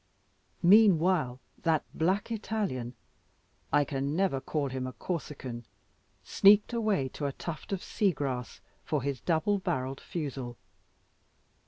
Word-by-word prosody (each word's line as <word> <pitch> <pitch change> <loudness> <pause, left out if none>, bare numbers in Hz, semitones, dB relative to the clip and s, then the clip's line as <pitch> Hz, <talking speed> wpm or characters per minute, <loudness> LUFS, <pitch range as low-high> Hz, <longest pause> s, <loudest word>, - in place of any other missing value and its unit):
Meanwhile, 175 - +5 0.2
that 160 -2 +2
black 190 +7 0
Italian, 200 - -2 0.8
I 145 0 +4
can 140 +1 -2
never 180 -7 +1
call 145 0 -2
him 130 0 -3
a 130 - -6
Corsican, 130 -4 -5 0.6
sneaked 205 +4 +5
away 215 - +1
to 145 +2 -3
a - - -2
tuft 165 +4 -7
of 195 -2 -2
sea 200 -3 +1
grass 130 -5 -4 0.2
for 150 -5 -1
his 140 -3 -2
double 190 +5 +1
barrelled 135 -6 -2
fusil. 135 -7 -5
150 Hz, 125 wpm, -30 LUFS, 130-190 Hz, 0.8 s, Meanwhile